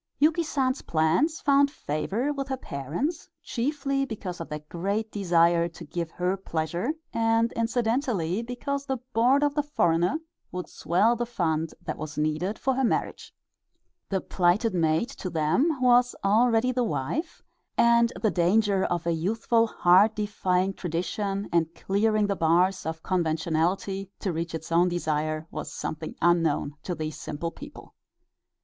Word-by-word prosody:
Yuki 315 Hz, +3 st, +3 dB
San's 270 Hz, -4 st, 0 dB
plans 170 Hz, -, +1 dB
found 280 Hz, 0 st, +4 dB
favor 230 Hz, -, -2 dB
with 275 Hz, -1 st, -4 dB
her 265 Hz, -1 st, -2 dB
parents, 170 Hz, -, -4 dB
chiefly 275 Hz, +2 st, -1 dB
because 200 Hz, -9 st, -5 dB
of 165 Hz, -, -7 dB
their 150 Hz, 0 st, -5 dB
great 200 Hz, +6 st, -2 dB
desire 170 Hz, -3 st, +3 dB
to 170 Hz, 0 st, -11 dB
give 170 Hz, +2 st, -4 dB
her 180 Hz, +3 st, -1 dB
pleasure, 175 Hz, -, -2 dB, 0.2 s
and 225 Hz, 0 st, +2 dB
incidentally 230 Hz, -, 0 dB
because 250 Hz, +4 st, -3 dB
the 265 Hz, -1 st, -1 dB, 0.2 s
board 255 Hz, +6 st, +4 dB
of 290 Hz, -1 st, +2 dB
the 295 Hz, -, +1 dB
foreigner 175 Hz, -, +1 dB, 0.3 s
would 180 Hz, 0 st, -5 dB
swell 205 Hz, +7 st, +2 dB
the 240 Hz, 0 st, -2 dB
fund 165 Hz, -8 st, -1 dB
that -, -, -5 dB
was 155 Hz, 0 st, -6 dB
needed 155 Hz, +7 st, -1 dB
for 265 Hz, -, 0 dB
her 265 Hz, +1 st, 0 dB
marriage. 240 Hz, -, -1 dB, 0.8 s
The 190 Hz, -2 st, 0 dB
plighted 185 Hz, +5 st, +1 dB
maid 160 Hz, +4 st, +2 dB
to 200 Hz, -8 st, -6 dB
them 170 Hz, -, +1 dB
was 245 Hz, -1 st, +4 dB
already 225 Hz, +4 st, +3 dB
the 250 Hz, 0 st, 0 dB
wife, 225 Hz, -, -3 dB, 0.3 s
and 235 Hz, 0 st, +5 dB
the 215 Hz, -, +3 dB
danger 195 Hz, +2 st, +2 dB
of 170 Hz, -1 st, -2 dB
a 170 Hz, -, +1 dB
youthful 225 Hz, +7 st, +1 dB
heart 195 Hz, +2 st, +4 dB
defying 195 Hz, -3 st, 0 dB
tradition 195 Hz, +4 st, -3 dB
and 165 Hz, -1 st, +1 dB
clearing 215 Hz, +2 st, +1 dB
the 200 Hz, -1 st, 0 dB
bars 175 Hz, +2 st, +2 dB
of 160 Hz, 0 st, -5 dB
conventionality 175 Hz, +3 st, 0 dB
to 190 Hz, -, -1 dB
reach 165 Hz, +1 st, -3 dB
its 160 Hz, +1 st, -7 dB
own 175 Hz, +2 st, +4 dB
desire 155 Hz, -2 st, -1 dB
was -, -, -5 dB
something 155 Hz, 0 st, -5 dB
unknown 165 Hz, -4 st, +2 dB
to 180 Hz, -, -4 dB
these 155 Hz, -1 st, -5 dB
simple 165 Hz, +3 st, -4 dB
people. -, -, -12 dB
195 Hz, 150 wpm, -26 LUFS, 165-240 Hz, 0.8 s, and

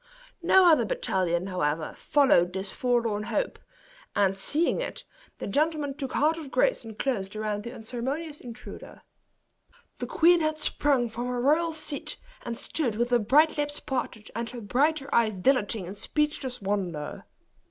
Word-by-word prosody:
No 370 Hz, +2 st, +6 dB
other 320 Hz, -2 st, +6 dB
battalion, 185 Hz, -, 0 dB
however, 160 Hz, -4 st, -1 dB
followed 220 Hz, -12 st, +3 dB
this 190 Hz, 0 st, -3 dB
forlorn 235 Hz, -4 st, 0 dB
hope; -, -, -2 dB, 0.6 s
and 195 Hz, -1 st, +3 dB
seeing 295 Hz, -, 0 dB
it, -, -, -5 dB, 0.3 s
the -, -, -5 dB
gentlemen 295 Hz, +4 st, 0 dB
took 270 Hz, -2 st, -5 dB
heart 315 Hz, +3 st, +2 dB
of 300 Hz, -4 st, -8 dB
grace -, -, +2 dB
and 220 Hz, -2 st, -9 dB
closed 215 Hz, -7 st, -2 dB
around 215 Hz, -1 st, -2 dB
the 235 Hz, -, -7 dB
unceremonious 260 Hz, +7 st, -4 dB
intruder. 245 Hz, 0 st, -10 dB, 1.0 s
The -, -, -3 dB
queen 345 Hz, +1 st, +5 dB
had 310 Hz, 0 st, 0 dB
sprung 280 Hz, -5 st, +1 dB
from 235 Hz, +2 st, -4 dB
her 250 Hz, 0 st, -2 dB
royal 310 Hz, +6 st, +3 dB
seat, 310 Hz, -2 st, -3 dB, 0.2 s
and 235 Hz, -1 st, -5 dB
stood 245 Hz, -7 st, -1 dB
with 240 Hz, +2 st, 0 dB
her 245 Hz, -, +5 dB
bright 295 Hz, +8 st, +4 dB
lips 290 Hz, 0 st, -1 dB
parted, 245 Hz, -5 st, -4 dB
and 230 Hz, +1 st, -2 dB
her 245 Hz, -1 st, -7 dB
brighter 275 Hz, +6 st, +1 dB
eyes 220 Hz, -3 st, +3 dB
dilating 210 Hz, -1 st, +1 dB
in 185 Hz, -, -6 dB
speechless 265 Hz, 0 st, -2 dB
wonder. 180 Hz, -7 st, -3 dB
245 Hz, 155 wpm, -27 LUFS, 205-300 Hz, 1.0 s, No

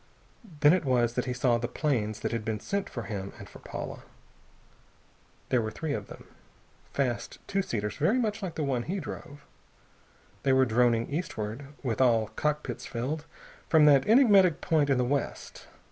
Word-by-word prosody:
Then 150 Hz, +2 st, +7 dB
it 185 Hz, -, +1 dB
was 120 Hz, -4 st, +2 dB
that 125 Hz, -, -1 dB
he 125 Hz, -, -2 dB
saw 120 Hz, -1 st, +2 dB
the 120 Hz, -, -2 dB
planes 110 Hz, -8 st, -1 dB
that -, -, -2 dB
had 115 Hz, -2 st, -2 dB
been 110 Hz, -1 st, -2 dB
sent 200 Hz, -, -3 dB
for 120 Hz, -, -5 dB
him 100 Hz, -3 st, -5 dB
and -, -, -10 dB
for -, -, -13 dB
Paula. -, -, -7 dB, 1.5 s
There 125 Hz, -, +3 dB
were 110 Hz, -, -2 dB
three 150 Hz, +6 st, -4 dB
of -, -, -4 dB
them, -, -, -12 dB, 0.7 s
fast 125 Hz, -6 st, -2 dB
two 195 Hz, 0 st, 0 dB
seaters 105 Hz, -, -3 dB
very 195 Hz, -, +2 dB
much 215 Hz, -4 st, -1 dB
like 185 Hz, -4 st, -4 dB
the 155 Hz, -, -2 dB
one 135 Hz, -4 st, 0 dB
he 185 Hz, +10 st, -3 dB
drove. 145 Hz, -4 st, -8 dB, 1.0 s
They 135 Hz, -, +2 dB
were 130 Hz, 0 st, +5 dB
droning 120 Hz, -1 st, +2 dB
eastward, 135 Hz, -6 st, -4 dB, 0.2 s
with 120 Hz, -2 st, -1 dB
all 115 Hz, -4 st, +3 dB
cockpits 150 Hz, 0 st, -2 dB
filled, 140 Hz, +6 st, -4 dB, 0.4 s
from 155 Hz, -2 st, +6 dB
that 140 Hz, -3 st, +5 dB
enigmatic 205 Hz, -, +6 dB
point 155 Hz, -5 st, +1 dB
in 135 Hz, -, +3 dB
the 125 Hz, -, +2 dB
west. 140 Hz, +1 st, -3 dB
130 Hz, 175 wpm, -28 LUFS, 120-160 Hz, 1.5 s, Then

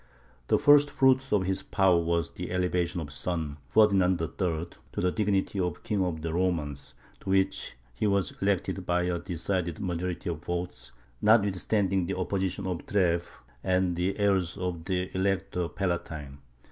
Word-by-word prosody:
The -, -, +4 dB
first 145 Hz, 0 st, +6 dB
fruit 130 Hz, -1 st, +3 dB
of 100 Hz, -3 st, +3 dB
his 95 Hz, +1 st, -1 dB
power 95 Hz, -3 st, +3 dB
was 85 Hz, -1 st, 0 dB
the -, -, -6 dB
elevation 90 Hz, -1 st, 0 dB
of 75 Hz, -, -6 dB
his -, -, -9 dB
son, 80 Hz, -2 st, -3 dB
Ferdinand 95 Hz, -2 st, +4 dB
III., 80 Hz, -1 st, -5 dB, 0.5 s
to -, -, -3 dB
the 90 Hz, -, +2 dB
dignity 100 Hz, -1 st, 0 dB
of 90 Hz, -3 st, -2 dB
King 100 Hz, -3 st, 0 dB
of 80 Hz, -4 st, -3 dB
the 80 Hz, -1 st, -2 dB
Romans, 80 Hz, -6 st, -2 dB, 0.2 s
to -, -, -8 dB
which 95 Hz, 0 st, +1 dB, 0.2 s
he 65 Hz, -, 0 dB
was 100 Hz, -2 st, +1 dB
elected 95 Hz, -1 st, 0 dB
by 90 Hz, 0 st, +2 dB
a 90 Hz, -1 st, -1 dB
decided 85 Hz, -1 st, -2 dB
majority 90 Hz, -1 st, -3 dB
of 80 Hz, -3 st, -3 dB
votes, 90 Hz, -5 st, -4 dB, 0.3 s
notwithstanding 100 Hz, -3 st, +2 dB
the -, -, -2 dB
opposition 95 Hz, 0 st, -2 dB
of 90 Hz, -2 st, -3 dB
Treves, 85 Hz, -4 st, +1 dB, 0.3 s
and 95 Hz, 0 st, +2 dB
of 90 Hz, -, -2 dB
the 90 Hz, +2 st, 0 dB
heirs 95 Hz, -4 st, +1 dB
of 90 Hz, -3 st, -3 dB
the 95 Hz, -1 st, -1 dB
Elector 95 Hz, -2 st, -1 dB
Palatine. 80 Hz, -7 st, -3 dB
90 Hz, 165 wpm, -28 LUFS, 85-95 Hz, 0.5 s, first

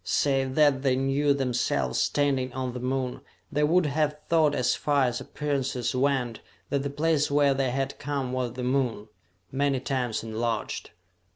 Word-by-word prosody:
Save 135 Hz, -2 st, +1 dB
that 145 Hz, -3 st, +4 dB
they 135 Hz, -2 st, +2 dB
knew 135 Hz, +2 st, +1 dB
themselves 125 Hz, -, 0 dB
standing 135 Hz, -3 st, +1 dB
on 130 Hz, -1 st, -3 dB
the 125 Hz, -, -5 dB
Moon, 130 Hz, 0 st, -2 dB, 0.3 s
they 150 Hz, 0 st, +1 dB
would 170 Hz, +3 st, +4 dB
have 150 Hz, 0 st, 0 dB
thought 155 Hz, -3 st, +4 dB
as 125 Hz, -3 st, +2 dB
far 145 Hz, -2 st, +1 dB
as 120 Hz, -1 st, -1 dB
appearances 135 Hz, -4 st, -2 dB
went, 130 Hz, -3 st, 0 dB, 0.3 s
that 140 Hz, -, +1 dB
the 140 Hz, -, -3 dB
place 150 Hz, +1 st, +1 dB
where 145 Hz, -1 st, +4 dB
they 135 Hz, -1 st, 0 dB
had 135 Hz, +2 st, -2 dB
come 140 Hz, -3 st, -3 dB
was 125 Hz, -2 st, -2 dB
the 125 Hz, 0 st, -5 dB
Moon, 125 Hz, -5 st, 0 dB, 0.4 s
many 140 Hz, 0 st, +1 dB
times 125 Hz, -4 st, -2 dB
enlarged. 115 Hz, +1 st, -3 dB
135 Hz, 165 wpm, -27 LUFS, 125-145 Hz, 0.4 s, that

